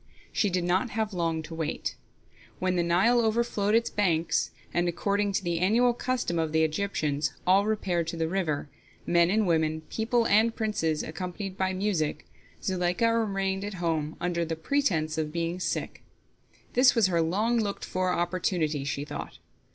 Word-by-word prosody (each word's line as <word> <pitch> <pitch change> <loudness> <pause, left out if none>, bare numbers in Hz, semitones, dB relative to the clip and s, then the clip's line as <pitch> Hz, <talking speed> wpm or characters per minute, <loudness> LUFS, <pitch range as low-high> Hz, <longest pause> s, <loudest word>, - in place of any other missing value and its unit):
She 210 - +1
did 180 -1 0
not 185 +7 +1
have 215 -1 -2
long 165 -2 -1
to 160 - -9
wait. 160 -2 -3 0.6
When 185 0 0
the 175 - +2
Nile 190 +8 +3
overflowed 220 -2 +1
its 230 0 +2
banks, 170 -5 +1 0.2
and, 175 0 +1
according 200 +3 0
to 195 - 0
the 170 -2 -1
annual 235 +7 +3
custom 240 -9 -1
of 160 -1 -1
the 160 0 +4
Egyptians, 155 -4 -1
all 195 +3 +4
repaired 180 -6 0
to 165 - -4
the 165 0 0
river, 165 -5 -1 0.4
men 170 0 +4
and 215 +2 +2
women, 160 -2 +1
people 230 +1 +1
and 225 +2 +3
princes, 165 -9 -1
accompanied 180 +4 -5
by 190 0 0
music, 185 -6 -1 0.4
Zuleika 185 +4 +1
remained 195 -3 0
at 205 -1 -5
home 160 -3 -1
under 175 -1 -1
pretense 160 - 0
of 155 -1 -2
being 170 +2 -2
sick. - - -3 0.7
This 250 +1 +5
was 230 -3 +4
her 170 -3 +2
long 210 +9 +1
looked 205 -2 -2
for 185 0 -1
opportunity, 170 -4 0
she 140 0 -3
thought. - - -7
180 Hz, 165 wpm, -28 LUFS, 165-210 Hz, 0.7 s, This